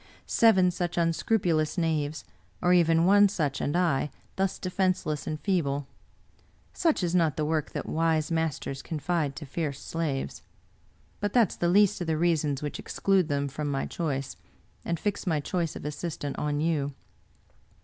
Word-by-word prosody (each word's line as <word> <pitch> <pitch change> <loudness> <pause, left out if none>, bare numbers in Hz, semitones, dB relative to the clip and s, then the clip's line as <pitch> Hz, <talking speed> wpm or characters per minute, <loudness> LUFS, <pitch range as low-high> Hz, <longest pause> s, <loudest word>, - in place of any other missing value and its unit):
Seven 190 -6 +4
such 175 -1 -3
unscrupulous 165 -1 +1
knaves, 155 -4 -1 0.3
or 180 - +3
even 165 -1 +4
one 205 +2 +6
such, 150 -8 -1
and 145 - 0
I, 160 -5 +1 0.3
thus 190 0 0
defenseless 185 -5 -1
and 155 -1 -3
feeble! 145 -5 0 0.9
Such 325 - +1
is 175 -1 0
not 165 -6 +2
the 155 - 0
work 155 -1 0
that - - -3
wise 160 0 +1
masters 160 -4 -2
confide 160 -2 -2
to 150 - -7
fierce 140 -1 -3
slaves. 155 -5 -3 0.8
But 205 -1 -2
that 235 -7 +4
is - - -9
the 175 - +1
least 200 0 +4
of 175 - -2
the 160 -1 +1
reasons 155 -4 +1
which 145 - -4
exclude 195 -4 +1
them 140 0 0
from 145 +2 -4
my 135 -1 -1
choice, 140 -5 -3 0.5
and 170 -1 -2
fix 205 -2 -2
my 160 -4 +2
choice 165 +2 -2
of - - -8
assistant 150 -1 -4
on 150 0 -1
you. 150 -3 0
160 Hz, 160 wpm, -28 LUFS, 150-180 Hz, 0.9 s, one